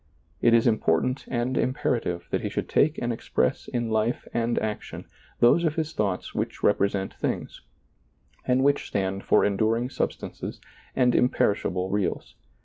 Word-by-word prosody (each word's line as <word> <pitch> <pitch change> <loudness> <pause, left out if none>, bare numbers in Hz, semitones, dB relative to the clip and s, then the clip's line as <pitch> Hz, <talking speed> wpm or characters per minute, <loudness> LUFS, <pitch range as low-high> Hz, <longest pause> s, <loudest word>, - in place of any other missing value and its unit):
It 120 0 +5
is 115 - +3
important 115 +3 +1
and 125 +1 -1
imperative 115 -9 -1
that - - 0
he - - -2
should - - -3
take 155 +2 +2
and 120 0 -1
express 65 - -1
in 120 -2 -2
life 110 +2 0
and 120 0 0
action 105 -1 -4 0.4
those 120 +8 +5
of 155 -2 +1
his 160 -1 -2
thoughts 100 -3 -2
which - - -3
rep 105 - +4
resent 100 -1 0
things, - - -4 0.8
and 130 +1 +2
which 140 +1 +2
stand 95 0 -2
for - - +4
enduring 110 +5 +1
sub - - 0
stances - - -8 0.4
and 125 -2 +3
imperishable 95 -6 +1
reals. 90 -11 -2
115 Hz, 155 wpm, -26 LUFS, 100-125 Hz, 0.8 s, It